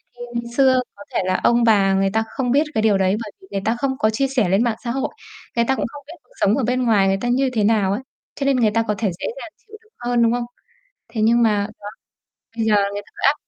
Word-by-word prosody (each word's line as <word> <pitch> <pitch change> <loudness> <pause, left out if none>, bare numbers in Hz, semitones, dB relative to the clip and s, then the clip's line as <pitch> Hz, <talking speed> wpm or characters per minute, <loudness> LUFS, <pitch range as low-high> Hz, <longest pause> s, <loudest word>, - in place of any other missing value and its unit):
Thì 240 - -13
ngày 235 - -1
xưa 260 -2 +5
có 200 - -12
thể - - +1
là 185 0 +1
ông 240 0 +4
bà 200 -4 +4
người 195 0 +2
ta 220 0 +2
không 250 -3 -2
biết 285 +3 +4
cái 220 - +1
điều 215 -3 +3
đấy, 190 +1 +2
bởi 210 - -9
vì 385 - -17
người 195 - -2
ta 225 - +1
không 265 -1 -1
có 215 - +3
chia 255 +5 0
sẻ 250 -9 0
lên 195 +4 +3
mạng 235 -3 0
xã 235 - -2
hội, 270 +2 -2 0.5
người 235 0 +2
ta 265 - +1
cũng - - -2
không 285 +4 -11
biết 325 - -9
cuộc - - -28
sống 205 +5 +3
ở 270 - 0
bên 250 +2 0
ngoài 210 -5 +3
người 195 0 +2
ta - - -2
như 260 +2 +2
thế 215 - +1
nào 205 -2 +2
ấy, 205 +6 -2 0.3
cho 275 - -3
nên 275 -2 +3
người 220 -3 +3
ta 230 +1 +1
có 210 - 0
thể 205 -2 0
dễ - - -4 0.2
dàng - - -9 0.2
chịu 435 - -12
đựng 440 +1 -30
hơn, 240 -1 +1
đúng 230 - +3
không? 245 0 -1 0.6
Thế 225 -1 -4
nhưng 235 +2 +4
mà 210 -2 +2
đó, 205 - -7 0.7
bây 225 - 0
giờ 215 - +3 0.2
người 205 - -4
ta - - -21
cứ - - -10
áp. 280 - +5
230 Hz, 295 wpm, -21 LUFS, 205-255 Hz, 0.7 s, xưa